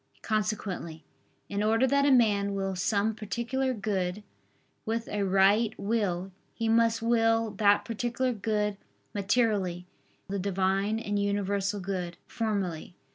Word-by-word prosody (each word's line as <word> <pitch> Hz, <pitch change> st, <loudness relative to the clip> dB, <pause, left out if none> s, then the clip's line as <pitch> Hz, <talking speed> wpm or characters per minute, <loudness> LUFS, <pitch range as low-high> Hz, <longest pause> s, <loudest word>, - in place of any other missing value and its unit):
Consequently, 205 Hz, -7 st, -2 dB, 0.4 s
in 200 Hz, 0 st, -2 dB
order 225 Hz, +4 st, +3 dB
that 280 Hz, +2 st, +3 dB
a -, -, +5 dB
man 205 Hz, -5 st, +3 dB
will 195 Hz, -1 st, -2 dB
some 200 Hz, +4 st, +1 dB
particular 235 Hz, +5 st, -2 dB
good 200 Hz, -3 st, -2 dB, 0.6 s
with 230 Hz, +1 st, -2 dB
a 205 Hz, -, -2 dB
right 200 Hz, +3 st, +3 dB
will, 195 Hz, -4 st, -1 dB, 0.2 s
he 230 Hz, -, -1 dB
must 230 Hz, 0 st, +3 dB
will 225 Hz, -1 st, +2 dB
that 205 Hz, -1 st, +4 dB
particular 240 Hz, +3 st, -1 dB
good 210 Hz, -1 st, -1 dB, 0.4 s
materially, 200 Hz, -4 st, +1 dB, 0.4 s
and 195 Hz, -, -6 dB
the 200 Hz, -, -1 dB
Divine 195 Hz, +2 st, 0 dB
and 205 Hz, -2 st, -2 dB
universal 200 Hz, 0 st, 0 dB
good, 180 Hz, -3 st, -4 dB
formally. 190 Hz, -7 st, -3 dB
205 Hz, 130 wpm, -28 LUFS, 195-225 Hz, 0.6 s, a